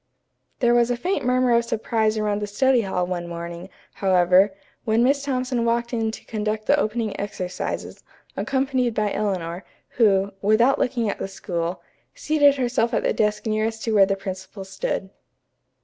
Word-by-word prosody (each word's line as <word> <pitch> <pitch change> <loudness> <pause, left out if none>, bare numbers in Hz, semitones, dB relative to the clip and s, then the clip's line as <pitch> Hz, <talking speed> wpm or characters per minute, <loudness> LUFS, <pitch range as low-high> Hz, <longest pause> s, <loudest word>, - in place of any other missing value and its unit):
There 240 -1 +4
was 240 0 +3
a 245 - 0
faint 365 +8 -1
murmur 250 0 +2
of 235 0 +4
surprise 220 -1 0
around 210 -1 -1
the 210 - -2
study 250 +4 +2
hall 185 -3 -1
one 175 -1 -4
morning, 170 +1 -7 0.2
however, 185 +1 +4 0.3
when 225 0 +2
Miss 280 +3 +3
Thompson 255 -3 -1
walked 235 +1 0
in 225 -1 0
to 220 - -8
conduct 215 0 -3
the 285 - +4
opening 220 -3 -2
exercises, 185 -3 -5 0.3
accompanied 260 -3 0
by 210 -1 0
Eleanor, 185 -4 -2 0.3
who, 200 -4 +3
without 225 +6 +3
looking 240 -3 0
at 205 - -3
the - - -3
school, 175 -3 -4 0.3
seated 290 -2 +3
herself 240 -3 0
at - - 0
the - - +1
desk 210 0 0
nearest 220 +1 -1
to 225 - -1
where 195 -2 +6
the 195 - +1
principal 190 0 -7
stood. 190 0 -4
215 Hz, 165 wpm, -23 LUFS, 195-240 Hz, 0.3 s, where